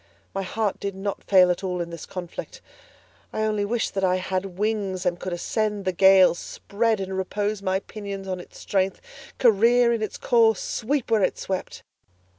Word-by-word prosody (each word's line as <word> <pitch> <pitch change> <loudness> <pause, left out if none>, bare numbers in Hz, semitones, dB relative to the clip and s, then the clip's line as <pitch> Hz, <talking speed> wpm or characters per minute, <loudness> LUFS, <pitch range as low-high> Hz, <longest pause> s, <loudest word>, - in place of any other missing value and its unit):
My 195 - -2
heart 205 +2 -2
did 200 -1 -4
not 195 +1 -4
fail 185 -2 +5
at 175 - -3
all 180 -1 -2
in 170 -1 -4
this 170 -2 -8
conflict; 180 -2 -7 0.7
I 215 - -2
only 215 -1 0
wished 225 +3 -1
that 195 -2 -2
I 185 -1 +3
had 185 0 -3
wings 200 -3 -1
and 175 -1 0
could 185 - -5
ascend 210 +3 -2
the 185 - +2
gale, 190 0 +6
spread 215 +5 -1
and 190 0 -4
repose 205 +2 -2
my 190 0 0
pinions 200 -2 -7
on 185 -1 -3
its 180 - -12
strength, 190 -1 -1 0.4
career 235 +1 +4
in 230 - -2
its 215 - -3
course, 225 -4 +3
sweep 250 +1 -2
where 220 -2 +4
it 185 - +1
swept. 190 -1 -4
195 Hz, 185 wpm, -24 LUFS, 185-215 Hz, 0.7 s, gale